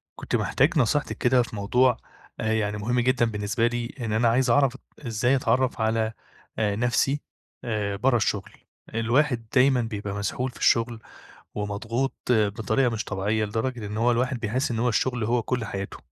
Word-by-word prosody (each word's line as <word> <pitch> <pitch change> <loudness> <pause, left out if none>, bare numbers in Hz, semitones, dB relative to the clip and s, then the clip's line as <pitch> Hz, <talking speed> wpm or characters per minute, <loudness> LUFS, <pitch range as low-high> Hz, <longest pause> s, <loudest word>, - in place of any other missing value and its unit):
كنت - - -3
محتاج 155 +6 +2
نصيحتِك 145 +4 +1
كده 125 0 +3
في 115 - -9
موضوع 125 +5 +2 0.4
آآ، 110 0 0
يعني 105 -1 0
مهم 120 +4 0
جدًا 130 0 +2
بالنسبة 110 +1 0
لي 120 0 -3
إن 115 -3 -2
أنا 115 +2 +3
عايز 125 +2 +2
أعرف 135 +1 +3 0.3
إزاي 120 +4 +2
أتعرّف 130 -2 +1
على 110 0 +1 0.5
آآ، 105 -2 +1
نفسي 120 +5 +1 0.4
آآ، 105 -4 -2
برّه 120 +5 +2
الشغل، 105 -3 -1 0.4
الواحد 120 +1 +1
دايمًا 130 -1 +5
بيبقى 105 -3 -4
مسحول 125 +5 -2
في - - -15
الشغل 115 0 +2 0.6
ومضغوط 110 +6 -2 0.2
بطريقة 110 +3 +2
مش 110 -2 -3
طبيعيّة، 105 +2 -1
لدرجة 110 +2 -3
إن 105 +1 -5
هو 115 +2 +3
الواحد 125 +1 0
بيحس 125 +6 -1
إن 115 - -2
هو 120 +2 +2
الشغل 125 +1 0
هو 120 +2 +1
كُلّ 120 0 -2
حياتُه، 100 -2 -5
115 Hz, 170 wpm, -25 LUFS, 110-125 Hz, 0.6 s, دايمًا